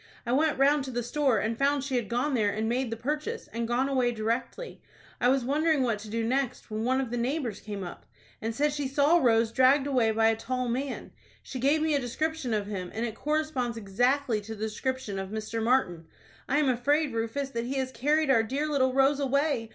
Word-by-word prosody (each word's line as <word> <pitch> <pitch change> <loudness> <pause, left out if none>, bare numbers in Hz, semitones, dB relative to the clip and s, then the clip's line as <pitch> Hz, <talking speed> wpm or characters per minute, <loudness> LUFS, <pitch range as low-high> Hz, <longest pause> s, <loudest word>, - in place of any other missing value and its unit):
I 240 - -2
went 300 +3 +2
round 280 +1 +4
to - - -6
the 245 -1 -2
store, 265 0 +1
and 220 +3 -1
found 280 0 +2
she 275 -2 -2
had 240 -5 -1
gone 250 +5 0
there 215 -5 +2
and 215 +2 -2
made 245 +2 0
the 230 - -4
purchase, 300 - -3
and 230 0 -2
gone 245 +3 +1
away 255 -3 +1
directly. 230 - -3 0.4
I 245 - +3
was 265 -2 +2
wondering 300 +1 +2
what 230 -4 0
to 215 +1 -9
do 230 +1 -2
next, 255 0 -2
when 215 +1 -2
one 260 +2 +2
of 260 -3 -3
the 245 - -2
neighbors 245 -3 -2
came 205 -2 -6
up, 175 - -9 0.3
and 225 0 -3
said 290 +3 +1
she 290 -2 -2
saw 285 +5 +3
Rose 230 -4 +3
dragged 265 +3 +4
away 255 -5 +2
by 225 0 +3
a 225 - +2
tall 250 +3 -3
man. 265 +4 -3 0.3
She 260 - -6
gave 290 +5 +2
me 315 -1 +1
a 285 - +2
description 310 +2 -2
of 210 -2 0
him, 190 -3 -5
and 225 +2 -1
it 225 - -4
corresponds 295 -4 -1
exactly 245 +3 +1
to 220 +2 -7
the 215 +1 -3
description 220 -2 -3
of 190 0 -5
Mr. 220 +2 -4
Martin. 205 -9 +1 0.4
I 280 - +2
am 300 -2 +2
afraid, 280 +3 +1
Rufus, 230 +5 -2
that 235 -1 -3
he 265 +3 -3
has 260 -1 -1
carried 295 +3 +2
our 230 -4 +5
dear 270 +7 -2
little 260 -4 +1
Rose 275 +1 +4
away. 280 -4 0
255 Hz, 230 wpm, -28 LUFS, 225-280 Hz, 0.4 s, our